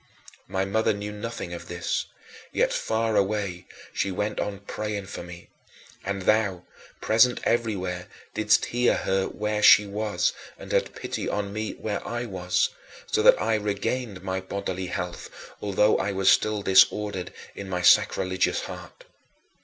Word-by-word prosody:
My 95 Hz, 0 st, -1 dB
mother 110 Hz, +2 st, +1 dB
knew 105 Hz, +1 st, -5 dB
nothing 105 Hz, -4 st, -6 dB
of 85 Hz, -, -8 dB
this; 85 Hz, 0 st, -2 dB, 0.4 s
yet, -, -, +1 dB
far 110 Hz, 0 st, 0 dB
away, 100 Hz, -3 st, -1 dB, 0.3 s
she 100 Hz, -, -1 dB
went 105 Hz, +3 st, -2 dB
on 100 Hz, -1 st, -3 dB
praying 105 Hz, 0 st, -4 dB
for 95 Hz, -, -7 dB
me. 85 Hz, 0 st, -11 dB, 0.5 s
And 100 Hz, 0 st, -3 dB
thou, 100 Hz, -4 st, +2 dB, 0.4 s
present 115 Hz, +3 st, +4 dB
everywhere, 95 Hz, -6 st, -1 dB, 0.3 s
didst 105 Hz, 0 st, +3 dB
hear 120 Hz, 0 st, +3 dB
her 95 Hz, 0 st, 0 dB
where 105 Hz, 0 st, -2 dB
she 105 Hz, 0 st, +8 dB
was 105 Hz, +1 st, -1 dB, 0.2 s
and -, -, -10 dB
had -, -, 0 dB
pity -, -, -4 dB
on 100 Hz, -1 st, -2 dB
me 110 Hz, 0 st, -3 dB
where 105 Hz, -2 st, -4 dB
I 120 Hz, +1 st, -3 dB
was, 90 Hz, -4 st, 0 dB, 0.4 s
so -, -, 0 dB
that -, -, +7 dB
I 115 Hz, -, +1 dB
regained 105 Hz, 0 st, -2 dB
my 95 Hz, 0 st, -2 dB
bodily 95 Hz, -1 st, -4 dB
health, 90 Hz, -1 st, -5 dB, 0.3 s
although 105 Hz, +1 st, +3 dB
I 100 Hz, -, -1 dB
was 95 Hz, 0 st, +4 dB
still 105 Hz, -1 st, +2 dB
disordered 95 Hz, -1 st, +3 dB, 0.2 s
in 100 Hz, -1 st, -8 dB
my 90 Hz, -1 st, -2 dB
sacrilegious 95 Hz, +1 st, +3 dB
heart. -, -, -9 dB
100 Hz, 150 wpm, -26 LUFS, 95-105 Hz, 0.5 s, she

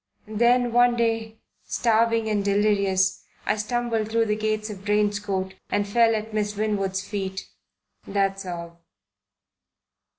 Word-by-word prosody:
Then 240 Hz, +2 st, +2 dB
one 245 Hz, 0 st, +5 dB
day, 225 Hz, -1 st, -1 dB, 0.3 s
starving 230 Hz, -1 st, +1 dB
and 210 Hz, -2 st, 0 dB
delirious, 200 Hz, -2 st, +2 dB, 0.2 s
I 210 Hz, -, +1 dB
stumbled 225 Hz, 0 st, -1 dB
through 230 Hz, 0 st, +2 dB
the 210 Hz, -1 st, 0 dB
gates 215 Hz, 0 st, -2 dB
of 195 Hz, -2 st, -9 dB
Drane's 205 Hz, 0 st, +1 dB
Court 190 Hz, -2 st, -3 dB, 0.2 s
and 205 Hz, 0 st, 0 dB
fell 225 Hz, +2 st, +4 dB
at 215 Hz, 0 st, -4 dB
Miss 210 Hz, -1 st, -1 dB
Winwood's 195 Hz, -2 st, -1 dB
feet. 190 Hz, -2 st, -4 dB, 0.6 s
That's 195 Hz, -1 st, 0 dB
all." 170 Hz, -1 st, -7 dB
210 Hz, 130 wpm, -24 LUFS, 200-225 Hz, 0.6 s, one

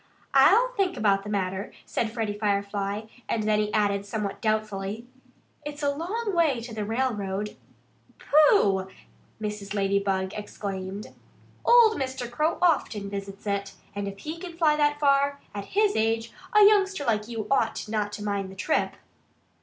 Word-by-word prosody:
"I'll -, -, +6 dB
think 390 Hz, -7 st, -1 dB
about 200 Hz, -2 st, +3 dB
the 205 Hz, -, -8 dB
matter," 190 Hz, -1 st, -2 dB
said 225 Hz, -2 st, -2 dB
Freddie 220 Hz, -3 st, -2 dB
Firefly. 200 Hz, 0 st, -1 dB, 0.3 s
And 220 Hz, -, 0 dB
then 210 Hz, 0 st, +2 dB
he 210 Hz, 0 st, 0 dB
added 200 Hz, -2 st, +1 dB
somewhat 200 Hz, 0 st, -4 dB
doubtfully: 215 Hz, 0 st, -2 dB, 0.6 s
"It's 295 Hz, 0 st, -7 dB
a 285 Hz, -, +3 dB
long 405 Hz, +9 st, -3 dB
way 310 Hz, -7 st, +3 dB
to 230 Hz, 0 st, -8 dB
the 215 Hz, -1 st, -3 dB
railroad." 210 Hz, -3 st, -2 dB, 0.6 s
"Pooh!" 245 Hz, -, +4 dB, 0.5 s
Mrs. 210 Hz, -1 st, -5 dB
Ladybug 195 Hz, -1 st, 0 dB
exclaimed. 200 Hz, -1 st, -6 dB, 0.5 s
"Old 470 Hz, -5 st, +6 dB
Mr. 260 Hz, -2 st, -3 dB
Crow 305 Hz, +7 st, 0 dB
often 215 Hz, -, +1 dB
visits 195 Hz, 0 st, -6 dB
it. 200 Hz, -1 st, -2 dB, 0.2 s
And 200 Hz, 0 st, -3 dB
if 200 Hz, 0 st, -6 dB
he 310 Hz, +10 st, -6 dB
can 350 Hz, 0 st, -7 dB
fly 310 Hz, -3 st, +4 dB
that 295 Hz, -1 st, +2 dB
far, 280 Hz, 0 st, +3 dB
at 200 Hz, -1 st, -5 dB
his 415 Hz, 0 st, +3 dB
age, 225 Hz, +1 st, 0 dB, 0.3 s
a -, -, +8 dB
youngster 395 Hz, -6 st, +3 dB
like 215 Hz, -3 st, 0 dB
you 225 Hz, -3 st, -4 dB
ought 230 Hz, -6 st, +1 dB
not 210 Hz, -1 st, -1 dB
to 205 Hz, 0 st, -6 dB
mind 200 Hz, -2 st, -2 dB
the 190 Hz, -, -11 dB
trip." 250 Hz, +12 st, 0 dB
215 Hz, 155 wpm, -26 LUFS, 200-285 Hz, 0.6 s, a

